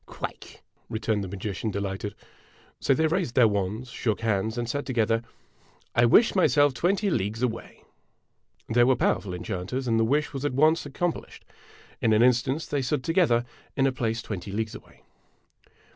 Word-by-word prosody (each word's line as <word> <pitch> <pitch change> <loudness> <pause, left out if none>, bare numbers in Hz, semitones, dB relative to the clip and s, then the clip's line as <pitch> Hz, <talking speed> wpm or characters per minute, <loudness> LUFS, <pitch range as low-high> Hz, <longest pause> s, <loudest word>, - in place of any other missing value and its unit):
" - - -36
Quite! - - -7
" - - -40
returned 110 -2 -1
the - - -4
magician, 100 +3 -4
delighted. 100 +1 -4 0.6
So 135 - +2
they 160 - +2
raised 160 -5 0
their 125 -3 +6
wands, 105 +4 -2
shook 110 -3 -2
hands, 110 +1 0
and 120 -1 -2
said 140 +4 -2
together: 115 -3 +1 0.4
" - - -33 0.3
I 120 - +5
wish 225 - +5
myself 145 -7 +4
twenty 195 +7 +1
leagues 110 - -1
away! 115 -2 -4 0.4
' - - -39
They 120 +1 +5
were 130 +1 +4
powerful 100 -5 0
enchanters, 95 +9 -4
and 115 -1 +2
the - - +4
wish 145 +7 0
was 135 0 -4
at 145 -3 -1
once 155 +2 +3
ac 140 - -12
complished. 175 -1 -3 0.6
In 110 - +3
an 110 +2 +5
instant 125 +4 +2
they 145 -1 +1
stood 130 +1 -1
together 155 -8 +2 0.3
in 135 - +3
a 135 - +3
place 115 -3 -2
twenty 100 -2 -6
leagues 110 +2 -2
away. - - -14
120 Hz, 185 wpm, -26 LUFS, 110-140 Hz, 0.6 s, their